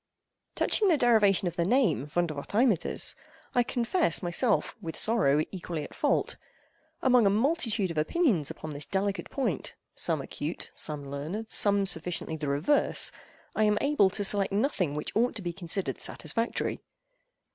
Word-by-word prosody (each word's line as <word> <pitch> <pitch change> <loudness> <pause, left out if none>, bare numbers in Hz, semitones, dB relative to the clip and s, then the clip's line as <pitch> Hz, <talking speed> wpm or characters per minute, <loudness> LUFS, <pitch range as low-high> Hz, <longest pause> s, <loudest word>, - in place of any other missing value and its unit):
Touching 420 - +2
the 335 -5 +4
derivation 215 -7 +3
of 175 - -4
the 170 - +2
name 190 - +1
Vondervotteimittiss, 175 - 0 0.4
I 245 - +3
confess 240 - 0
myself, 200 +6 +1
with 165 -3 -6
sorrow, 155 -10 +2
equally 170 -4 -5
at - - -10
fault. - - 0 0.7
Among 250 -5 +5
a - - +5
multitude 225 - +1
of 160 - -2
opinions 185 - +1
upon 155 - -7
this 145 0 -3
delicate 200 0 -2
point—some 235 - -3
acute, - - -5
some 145 -2 -4
learned, 175 +11 -5
some 200 -1 +4
sufficiently 170 -2 +1
the 150 -2 -5
reverse—I 170 - 0
am 210 0 +2
able 280 -9 +3
to 205 +2 -2
select 200 0 +1
nothing 200 - 0
which 150 - -4
ought 235 +2 +1
to 210 - -5
be 175 -1 -3
considered 180 +2 -2
satisfactory. 230 0 -2
195 Hz, 145 wpm, -28 LUFS, 165-230 Hz, 0.7 s, Among